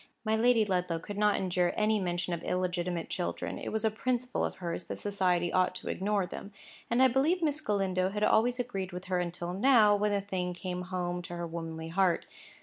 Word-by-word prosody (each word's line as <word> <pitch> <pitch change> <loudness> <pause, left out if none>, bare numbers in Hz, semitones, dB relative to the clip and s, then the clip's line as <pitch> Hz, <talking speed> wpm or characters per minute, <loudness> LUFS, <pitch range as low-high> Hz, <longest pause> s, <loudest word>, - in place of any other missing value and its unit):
My 215 0 +2
Lady 230 -1 +4
Ludlow 180 -3 0
could 205 +5 -6
not 210 -1 +4
endure 180 -1 +1
any 215 0 +2
mention 175 -1 -2
of 170 - -3
illegitimate 180 -2 -1
children. 175 - -3
It - - -5
was 220 +1 0
a 220 - +3
principle 250 +2 -1
of - - -2
hers 175 -1 -4
that - - -5
society 180 -4 0
ought 185 0 +2
to - - -6
ignore 200 0 0
them. 200 +3 -8 0.4
And 240 +3 +4
I - - +8
believe 295 +8 +2
Miss 305 -1 +1
Galindo 190 -6 0
had 210 +2 -2
always 240 +4 +3
agreed 195 -7 -3
with 180 +1 -6
her 185 -1 0
until 175 0 -3
now, 215 0 +5
when 210 +1 +1
the 200 - +2
thing 185 -3 -3
came 180 0 -4
home 180 -1 -3
to 175 0 -7
her 170 0 -3
womanly 165 -1 -5
heart. 180 0 +2
185 Hz, 210 wpm, -30 LUFS, 180-215 Hz, 0.4 s, I